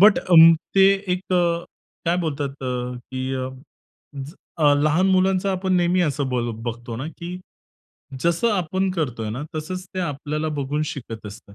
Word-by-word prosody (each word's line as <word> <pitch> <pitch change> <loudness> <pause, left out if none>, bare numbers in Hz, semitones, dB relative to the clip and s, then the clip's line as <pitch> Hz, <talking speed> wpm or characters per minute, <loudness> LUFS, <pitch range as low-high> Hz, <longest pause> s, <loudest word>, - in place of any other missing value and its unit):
But 210 +1 +7
अं, 165 -2 +8 0.2
ते 195 0 +7 0.3
एक 185 0 -6
अ, 170 -1 +2 0.4
काय 170 +1 +2
बोलतात 140 -2 -4
अ, 125 -1 -3 0.2
की 130 0 -3
अ, 130 0 -2 0.7
ज 140 +2 -6 0.3
अ, 145 -2 +6
लहान 155 +5 +3
मुलांचा 190 +1 +2
आपण 190 0 -1
नेहमी 175 +1 +2
असं 145 -4 0
बल 120 -2 -1
बघतो 120 0 -5
ना 130 +5 -4
की 175 +1 -6 0.8
जसं 170 +7 +2
आपण 190 +1 0
करतोय 125 - -2
ना, 125 +6 -4
तसंच 185 +4 -4
ते 185 - -1
आपल्याला 150 -1 -2
बघून 145 +2 -1
शिकत 115 -6 -7
असतात. 100 0 -11
155 Hz, 160 wpm, -23 LUFS, 130-180 Hz, 0.8 s, अं